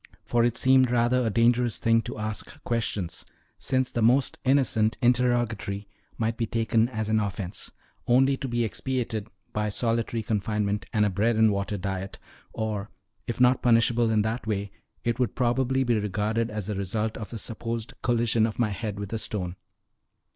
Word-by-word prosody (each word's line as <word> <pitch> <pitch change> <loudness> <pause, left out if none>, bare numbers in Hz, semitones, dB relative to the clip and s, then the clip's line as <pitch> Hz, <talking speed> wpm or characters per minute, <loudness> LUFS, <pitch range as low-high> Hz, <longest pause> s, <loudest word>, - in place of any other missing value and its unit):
For 120 -1 +2
it 120 -1 +1
seemed 130 -1 +5
rather 120 +1 +2
a 115 - +1
dangerous 120 +2 +3
thing 115 0 +3
to - - -6
ask 110 -1 -4
questions, 110 -7 -2 0.4
since 130 -1 +1
the 120 - -1
most 125 +4 +3
innocent 130 -5 +2
interrogatory 120 -5 +1 0.3
might 115 0 -1
be 115 - -1
taken 115 0 +1
as 110 -4 -3
an 110 0 +2
offense, 95 -3 -4 0.4
only 135 +3 +4
to 135 - -4
be 120 -1 0
expiated 115 -1 -3 0.3
by 105 0 0
solitary 115 +1 -1
confinement 105 -1 -1
and 105 -3 +3
a 105 - +1
bread 110 +5 +1
and 110 -1 +5
water 100 +1 -2
diet; 95 +1 -4 0.3
or, 105 -2 -3 0.4
if 120 - -3
not 125 0 +4
punishable 115 0 +3
in 110 -1 +3
that 110 +1 -3
way, 100 -2 -2 0.3
it 120 0 -1
would 125 - 0
probably 130 +2 +1
be 120 -3 +2
regarded 105 +3 -1
as 105 -2 -4
a 105 - -1
result 105 +3 -2
of 110 - -6
the 115 - -6
supposed 115 +1 -4
collision 115 -2 +2
of 110 - -6
my 120 -3 +2
head 105 0 -4
with 100 +1 -5
a 115 - -1
stone. 90 -5 -3
115 Hz, 175 wpm, -26 LUFS, 105-120 Hz, 0.4 s, seemed